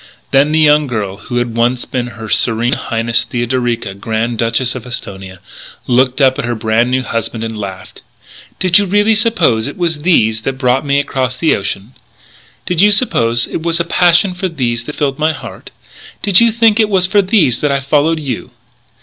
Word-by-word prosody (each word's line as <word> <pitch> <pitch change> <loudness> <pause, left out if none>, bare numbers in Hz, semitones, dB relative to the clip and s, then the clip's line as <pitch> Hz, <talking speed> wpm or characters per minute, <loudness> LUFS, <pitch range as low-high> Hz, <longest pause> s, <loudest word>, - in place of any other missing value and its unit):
Then 140 +2 +3
the 155 - +1
young 150 -1 +4
girl 105 -6 -4
who 120 +4 -5
had 120 -2 -2
once 120 +1 0
been 125 -2 -3
Her 110 0 -7
Serene 120 +3 +1
Highness 115 -3 -1
Theodorica, 120 -3 -2
Grand 110 +3 -3
Duchess 115 +2 0
of 125 -1 -8
Esthonia, 95 -5 -7 0.5
looked 125 +2 +1
up 130 -2 +3
at - - -2
her 120 0 -2
brand 110 +2 +1
new 130 0 0
husband 115 -1 -3
and 115 0 -5
laughed. 95 -3 -8 0.6
"Did 185 0 +3
you 200 - 0
really 205 +3 +3
suppose 185 - +1
it 145 - -8
was 165 -4 -2
these 110 -10 +2
that 135 - -2
brought 130 +1 +1
me 140 0 +2
across 130 -3 -2
the 160 - +2
ocean? 100 +4 -5 0.7
Did 175 -1 0
you 205 - +6
suppose 120 - +1
it - - -5
was 170 0 0
a - - +2
passion 175 +2 +3
for 185 +1 -3
these 120 -7 -2
that 150 - -7
filled 140 -1 -2
my 155 +1 +1
heart? - - -10 0.5
Did 200 0 +4
you 235 -1 +4
think 225 -1 +3
it 215 -1 +3
was 190 -3 +2
for 200 +3 +3
these 185 - +2
that 145 - 0
I 140 - +1
followed 150 +4 +1
you?" 130 -5 -5
130 Hz, 195 wpm, -14 LUFS, 115-165 Hz, 0.7 s, you